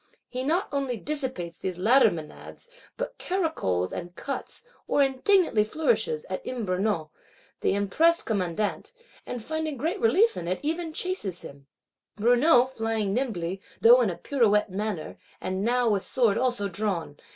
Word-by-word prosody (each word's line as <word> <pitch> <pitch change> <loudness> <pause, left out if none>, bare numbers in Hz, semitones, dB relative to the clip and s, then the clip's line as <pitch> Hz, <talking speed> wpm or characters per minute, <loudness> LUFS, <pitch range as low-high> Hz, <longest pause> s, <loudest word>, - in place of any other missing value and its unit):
He 255 - -4
not 320 +8 0
only 275 -4 -1
dissipates 255 - -3
these 185 -2 -4
latter 235 +9 +5
Menads; 160 - -9 0.3
but - - -5
caracoles 315 - -1
and 175 0 -6
cuts, 275 - -5 0.2
or 285 - +3
indignantly 270 - +3
flourishes, 455 - 0
at - - -4
M. 245 -4 -4
Brunout, 185 -4 -1 0.5
the - - +1
impressed 320 - +2
commandant; 205 - -2 0.3
and, 245 -3 -5
finding 315 -1 -3
great 330 - -2
relief 455 0 +4
in 170 - -5
it, 185 +1 -1
even 325 +2 -2
chases 310 - -3
him; 140 0 -12 0.5
Brunout 245 +3 +5
flying 225 -4 -1
nimbly, 195 -7 -2 0.2
though 245 +2 +7
in 225 - +2
a 170 - -4
pirouette 210 -4 +2
manner, 200 -4 -4 0.2
and 190 +1 -3
now 245 +2 +2
with 205 -3 +2
sword 235 -6 +2
also 245 -5 0
drawn. 180 -6 -3
235 Hz, 150 wpm, -26 LUFS, 190-300 Hz, 0.5 s, though